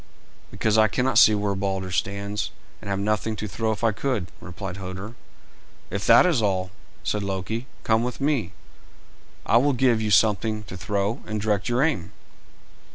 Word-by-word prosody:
"Because 110 +2 +1
I 110 - +6
cannot 125 +6 +2
see 110 - +7
where 105 -1 0
Balder 95 -1 -2
stands, 100 +2 -2 0.3
and - - -8
have 100 - 0
nothing 105 +2 -1
to 105 - -5
throw 110 +3 -1
if 110 - -5
I 115 - +4
could," 110 -5 -2
replied 90 +1 -7
Hoder. 95 +3 -7 0.8
"If 100 0 -3
that 115 - +8
is 165 -10 +2
all," 95 -3 0 0.3
said 105 - -1
Loki, 100 +5 -3 0.2
"come 110 0 +2
with 125 0 -4
me. 135 - 0 0.9
I 115 - +4
will 140 +4 +3
give 120 -3 +2
you 110 - -1
something 105 +2 +2
to 95 - -9
throw, 105 +4 -2
and 110 0 -2
direct 105 +1 0
your 120 +3 +2
aim." 105 - -1
105 Hz, 170 wpm, -24 LUFS, 100-115 Hz, 0.9 s, that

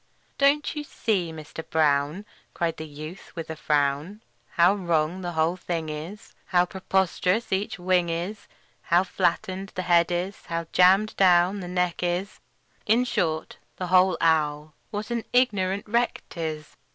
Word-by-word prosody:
"Don't 285 +3 +3
you 300 - -3
see, 200 - -1
Mister 160 0 -8
Brown," 155 +4 +1 0.3
Cried 170 -1 -1
the 155 - -6
youth, 155 +5 -9
with 165 -1 -5
a - - -5
frown, 150 +7 0 0.3
"How 175 +3 +5
wrong 170 -2 0
the 175 -1 -4
whole 160 +3 +1
thing 165 -3 -3
is, 165 +9 -8
How 180 -1 +3
preposterous 190 +3 0
each 195 +2 -1
wing 180 -1 +1
is, 180 +6 -4 0.3
How 175 +2 +3
flattened 185 +1 -1
the 185 - -2
head 170 -1 +4
is, 180 +3 -3
how 165 0 -3
jammed 190 +4 +4
down 185 +1 +4
the 180 - -6
neck 180 -1 -1
is 180 +3 -2 0.5
In 225 +4 +4
short, 160 -9 -1 0.2
the 185 - -4
whole 185 0 +5
owl, 150 -2 +1 0.2
what 210 +2 -5
an 235 -1 -1
ignorant 200 -6 +1
wreck 235 +3 0
't 170 - -6
is! 155 -2 -5
180 Hz, 155 wpm, -25 LUFS, 160-195 Hz, 0.5 s, How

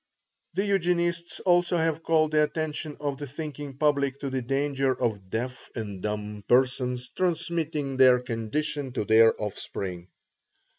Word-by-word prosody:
The 195 +2 +1
Eugenists 175 -3 0
also 175 -1 +3
have 160 -1 0
called 160 -1 +2
the 155 0 +4
attention 155 0 -2
of 145 -2 -3
the 145 - -5
thinking 145 -1 -7
public 140 -2 +1
to 140 -2 -3
the 130 -1 -1
danger 135 +1 0
of 105 -6 -2
deaf 125 +5 -4
and 105 -5 -5
dumb 105 0 -4
persons 125 0 +2
transmitting 165 -5 -1
their 130 -1 +7
condition 130 +4 -3
to 115 - -2
their 115 +1 +5
offspring. 95 -3 -5
140 Hz, 140 wpm, -27 LUFS, 120-155 Hz, -, their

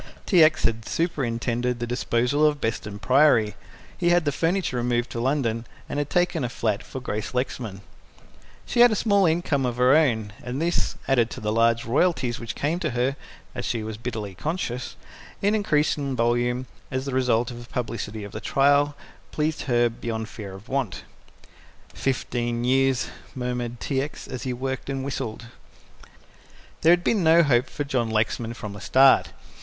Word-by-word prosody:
T. 175 -4 +6
X. 155 0 +3
had 115 0 0
superintended 125 -6 -1
the 120 - -2
disposal 125 +3 0
of 150 -1 +3
Beston 105 -3 -3
Priory. 115 0 +4 0.4
He 175 - +1
had 175 -2 +3
the 145 - +2
furniture 165 -2 0
removed 120 0 0
to 115 - -4
London, 120 -4 0 0.2
and 145 - -3
had 145 0 -2
taken 175 -4 +1
a 120 - -1
flat 110 -2 -1
for 130 - -7
Grace 110 -1 -4
Lexman. 115 -6 -3 0.8
She 240 - -2
had 240 0 +8
a - - +1
small 200 -4 +3
income 160 -4 +1
of 120 -1 -1
her 125 +3 +5
own, 110 -10 +2
and 125 +2 -4
this, 170 +2 0
added 120 -4 +3
to - - -7
the 105 0 -2
large 115 +1 +3
royalties 130 -2 +1
which 115 -1 -5
came 155 +5 -1
to 165 -4 -1
her 130 +3 +1 0.4
(as - - -5
she 115 -2 -2
was 110 -1 -5
bitterly 110 -4 -5
conscious) 130 - -4 0.4
in 205 +1 +2
increasing 150 -8 +1
volume 120 +1 +1 0.2
as 130 +1 -3
the 135 - -4
result 125 -2 +1
of 120 0 -8
the 120 - -16
publicity 110 -3 -4
of 100 - -8
the - - -6
trial, 145 +1 +3 0.4
placed 155 +1 -1
her 120 -1 +4
beyond 115 -1 -4
fear 100 -4 -8
of 95 +5 -12
want. 130 -7 -2 0.9
"Fifteen 120 -2 -2
years," 135 0 +2 0.3
murmured 125 -2 -3
T. 135 -2 -1
X., 145 +2 -6
as 130 - -6
he 130 - -3
worked 130 +2 -4
and 135 -1 -2
whistled. 120 -4 -4 1.4
There 165 - +6
had 175 0 +4
been 205 -1 +2
no 165 +1 +6
hope 125 -3 +2
for 145 - -3
John 125 -5 -1
Lexman 110 +1 -1
from 105 -3 -7
the 100 - -9
start. 135 0 +5
125 Hz, 175 wpm, -25 LUFS, 115-145 Hz, 1.4 s, had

